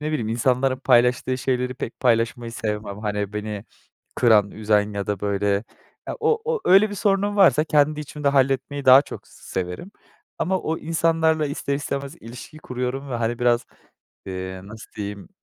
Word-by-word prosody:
ne 150 - -3
bileyim 120 -8 -2
insanların 130 +3 +1
paylaştığı 125 0 +2
şeyleri 125 0 -1
pek 120 - -7
paylaşmayı 115 -1 +1
sevmem. 105 -3 -4
Hani, 105 -1 -3
beni 105 0 -5 0.5
kıran, 105 -4 +4
üzen 105 -1 +1
ya 100 -1 -3
da, 105 -2 -2
böyle, 100 0 -1 0.6
ya, - - -4
o 455 -1 +2
o 470 -1 -1
öyle, 200 +3 +5
bir - - -5
sorunum 205 0 +1
varsa 170 -6 +5
kendi 150 0 +2
içimde 150 -1 -3
halletmeyi 135 +1 +1
daha 130 +2 +8
çok - - -10
s - - -18 0.2
severim 90 - -6 0.5
ama 190 +2 0
o 160 +1 -2
insanlarla 160 -1 +1
ister 140 0 -3
istemez 140 +1 -4
ilişki 120 +6 -10
kuruyorum 130 0 -4
ve, - - -2
hani, 115 0 -2
biraz, 120 -1 +2 0.6
eee, 95 0 -6
nasıl 105 +2 -12
diyeyim? 100 - -6
125 Hz, 165 wpm, -23 LUFS, 105-150 Hz, 0.6 s, daha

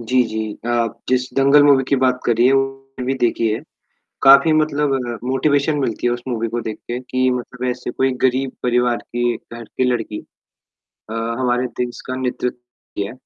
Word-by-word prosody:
जी, 125 +2 +2
जी। 110 -1 -4
आप 115 -1 0
जिस 130 0 +1
दंगल 140 +2 +5
मूवी 140 -2 +5
की 140 - +3
बात 125 -1 +2
कर 120 - +3
रही 120 - +4
है 130 - +5
वो 135 -1 -2
भी 130 +2 0
देखी 120 -3 +1
है। 110 - -2 0.6
काफ़ी 140 +4 +7
मतलब 150 -2 +1 0.3
मोटिवेशन 140 +3 +1
मिलती 120 -3 -1
है 120 - +2
उस 120 - -5
मूवी 115 -2 -1
को 120 +2 -3
देख 110 -1 -5
के 120 +1 -3
कि 130 0 0
मतलब 125 0 -4
ऐसे 125 0 -4
कोई 130 +1 +1
गरीब 130 +1 +1
परिवार 125 -1 +2
की 120 0 -2
घर 115 0 -11
की 120 - -3
लड़की। 115 -3 -3 0.9
अ, - - -5 0.3
हमारे 125 0 +1
देश 125 -1 -3
का 130 - -3
नेतृत्व 125 -1 -2 0.4
किया। 100 +1 -2
125 Hz, 185 wpm, -20 LUFS, 120-135 Hz, 0.9 s, काफ़ी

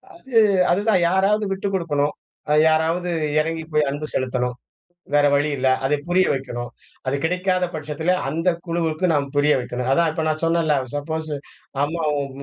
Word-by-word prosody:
அது, 265 -8 -10 0.4
அதுதான் 200 +1 +2
யாராவது 200 +3 +2
விட்டு 195 +1 -2
குடுக்கணும். 150 -5 0 0.6
யாராவது 165 +3 +1 0.3
இறங்கி 160 +1 -1
போய் 150 -2 +3
அன்பு 145 +2 -4
செலுத்தணும். 125 -1 -1 0.6
வேற 145 0 +5
வழி 145 +2 +2
இல்ல. 130 +1 +1 0.2
அதை 150 - +2
புரிய 185 +2 +3
வைக்கணும். 120 -3 -4 0.4
அது 130 - +1
கிடைக்காத 180 +1 +1
பட்சத்துல, 155 +3 -2 0.2
அந்த 165 +3 0 0.2
குழுவுக்கு 165 0 -1
நாம் 145 -2 +1
புரிய 145 +1 +4
வைக்கணும். 125 0 -4
அதான் 165 +3 +3
இப்ப 160 0 -3
நான் 155 0 -1
சொன்னேன்ல்ல, 165 -2 +2 0.2
சப்போஸ் 155 +2 -3 0.5
அம்மாவும் 150 -3 -1
160 Hz, 145 wpm, -22 LUFS, 145-175 Hz, 0.6 s, வேற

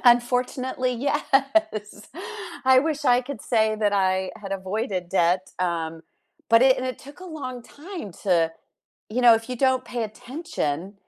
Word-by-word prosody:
Unfortunately, 250 +1 +2
yes. 275 -4 0 0.6
I 260 0 +7
wish 300 +1 0
I 245 -1 +5
could 275 +2 -7
say 220 -2 +2
that 210 -1 +1
I 190 -1 +1
had 195 -1 -6
avoided 190 -1 -3
debt, 180 +1 +1
um, 165 -2 -2 0.5
but 230 +1 +6
it 260 0 +6
and 255 - -3
it 255 - -4
took 285 +5 -13
a - - -9
long 265 -8 -6
time 315 - -9
to, 170 -4 +3 0.6
you 235 +4 -1
know, 240 -2 +8
if 225 +1 -3
you 250 - -3
don't 260 0 +2
pay 240 -1 -3
attention, 215 - -4
240 Hz, 155 wpm, -24 LUFS, 195-260 Hz, 0.6 s, know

